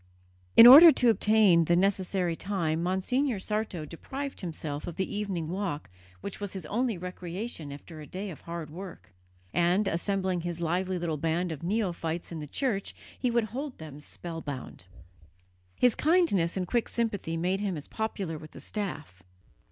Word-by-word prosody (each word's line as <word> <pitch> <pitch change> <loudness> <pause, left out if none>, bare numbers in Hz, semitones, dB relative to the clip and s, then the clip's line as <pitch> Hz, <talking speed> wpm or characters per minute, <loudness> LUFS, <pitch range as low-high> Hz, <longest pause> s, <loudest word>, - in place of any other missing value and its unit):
In 230 - +12
order 300 +7 +12
to 245 -5 +4
obtain 210 -6 +4
the 170 - +3
necessary 185 -2 +1
time 165 -4 -1
Monsignor 205 +8 0
Sarto 200 -5 -3
deprived 270 - -6
himself 155 -4 -5
of 170 - -5
the 190 +2 -2
evening 195 -6 -2
walk 170 - -4 0.3
which 200 - -6
was 205 -2 -5
his 190 - -6
only 235 -2 -1
recreation 180 -1 -6
after 155 +3 -10
a 150 - -10
day 195 +1 -5
of 155 - -11
hard 170 -2 -6
work; 180 - -10 0.4
and, 175 +4 +2
assembling 190 0 -1
his 175 0 -4
lively 180 +3 -1
little 165 -3 -2
band 165 +3 -1
of 160 - -6
neophytes 175 -4 -2
in 165 - -5
the 150 - -6
church, 210 - -2 0.2
he 250 - +1
would 235 -1 +2
hold 275 +1 -5
them 150 -2 -9
spellbound. 150 - -7 0.9
His 245 -2 +4
kindness 300 - +2
and 180 -1 -2
quick 235 +4 0
sympathy 205 -8 -2
made 180 +3 0
him 200 -4 -2
as 150 - -7
popular 195 -7 -3
with 155 0 -12
the - - -10
staff. 150 - -5
180 Hz, 165 wpm, -28 LUFS, 165-210 Hz, 0.9 s, In